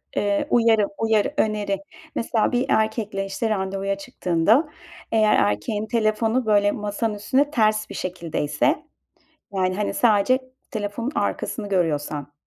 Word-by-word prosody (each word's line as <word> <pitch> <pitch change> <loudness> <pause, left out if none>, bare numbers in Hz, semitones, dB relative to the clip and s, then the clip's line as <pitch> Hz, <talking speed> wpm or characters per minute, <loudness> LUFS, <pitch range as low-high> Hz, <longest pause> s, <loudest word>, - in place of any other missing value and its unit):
eee, 205 -1 0
uyarı, 225 -3 +4
uyarı 220 +4 +1
öneri. 210 -2 0 0.4
Mesela 230 -1 +1
bir 245 +1 +1
erkekle, 215 -2 0
işte, 195 +3 -2
randevuya 195 -1 -1
çıktığında 195 - +1 0.4
eğer 215 -1 +4
erkeğin 205 - -2
telefonu 225 +2 +1
böyle 205 -1 +3
masanın 210 +1 -2
üstünde 265 +8 +1
ters 215 -3 +2
bir - - -8
şekildeyse 175 - -1 0.7
yani 185 -1 0
hani 210 +1 -1
sadece 225 +2 +3 0.3
telefonun 215 +4 -3
arkasını 205 -3 -2
görüyorsan. 150 -5 -1
210 Hz, 120 wpm, -23 LUFS, 195-225 Hz, 0.7 s, uyarı